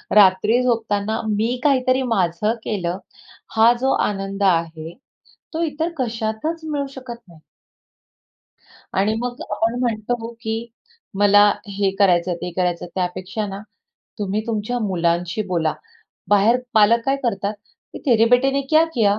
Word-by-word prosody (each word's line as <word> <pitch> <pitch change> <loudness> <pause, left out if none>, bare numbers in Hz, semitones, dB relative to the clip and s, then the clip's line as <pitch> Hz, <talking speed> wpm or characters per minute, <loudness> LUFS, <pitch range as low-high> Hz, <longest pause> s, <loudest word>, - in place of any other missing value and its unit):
रात्री 210 +4 +5
झोपताना 220 -3 0
मी 225 +4 0
काहीतरी 260 -2 +3
माझं 190 +2 +1
केलं, 180 -4 -2 0.6
हा 225 +1 +6
जो 265 +1 +2 0.2
आनंद 195 0 -4
आहे, 165 -1 -3 0.6
तो 325 +1 -1
इतर 320 +1 -1
कशातच 230 +5 -2
मिळू 285 -2 -2
शकत 255 -3 -7
नाही. 170 -3 -17 1.6
आणि 200 +3 +2
मग 245 0 -4
आपण 225 +3 0
म्हणतो, 235 0 -2
की 225 0 -4 0.5
"मला 205 0 +6 0.3
हे 200 -1 +2
करायचंय, 180 -2 +3
ते 175 +1 -6
करायचंय," 180 -1 -1
त्यापेक्षा 185 +3 -3
ना, 195 0 -6 0.6
तुम्ही 205 0 -1
तुमच्या 230 +2 -2
मुलांशी 175 0 0
बोला. 170 -4 0 0.5
बाहेर 205 +4 +4 0.2
पालक 220 +2 +5
काय 270 0 +2
करतात, 200 -2 -1 0.4
की - - -7
"तेरे 230 -4 +5
बेटे 250 +2 +4
ने 275 +1 0
क्या 315 +1 +6
किया?" 210 -4 +3
215 Hz, 130 wpm, -21 LUFS, 195-240 Hz, 1.6 s, हा